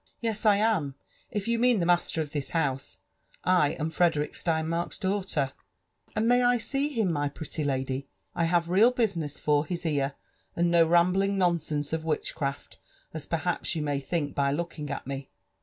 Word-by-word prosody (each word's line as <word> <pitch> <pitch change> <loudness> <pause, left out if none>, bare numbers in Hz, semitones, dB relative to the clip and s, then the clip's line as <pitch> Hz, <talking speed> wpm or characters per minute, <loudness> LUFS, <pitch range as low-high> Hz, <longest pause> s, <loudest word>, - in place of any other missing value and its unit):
" - - -38
*' - - -49
Yes, 225 -2 -1
I 205 - +7
am 200 -10 +1 0.2
— - - -33
if 205 -1 -3
you 235 0 +1
mean 245 -2 +4
the 170 - +1
master 175 -2 +2
of 150 -2 -5
this 145 -2 -2
house^ 140 -5 -1 0.3
— - - -33 0.2
I 145 - 0
am 160 +1 -3
Frederick 165 -3 +1
Steinmark's 165 +1 -1
daughter/' 190 -8 -1 0.2
> - - -49
'* - - -34
And 215 +1 +1
may 245 +1 +5
I 245 0 +4
see 275 +5 +1
him, 225 -10 0
my 145 -2 0
pretty 155 +1 -4
lady? 135 -1 -2 0.3
I 170 - +1
have 170 0 +2
real 210 +6 +6
business 185 - -1
for 150 -1 +2
his 170 +2 -5
ear, 140 -3 0 0.4
and 170 0 +2
no 170 -1 +5
rambling 185 +4 +3
nonsense 160 -5 0
of 160 -1 -1
witchcraft, 150 -3 -3 0.3
as 155 -2 -6
perhaps 175 +1 -1
you 155 - -1
may 145 -2 -1
think 145 +1 -2
by 140 -1 +1
looking 150 -1 -4
at 140 - -4
me.'' 135 0 -5
165 Hz, 200 wpm, -28 LUFS, 145-195 Hz, 0.4 s, I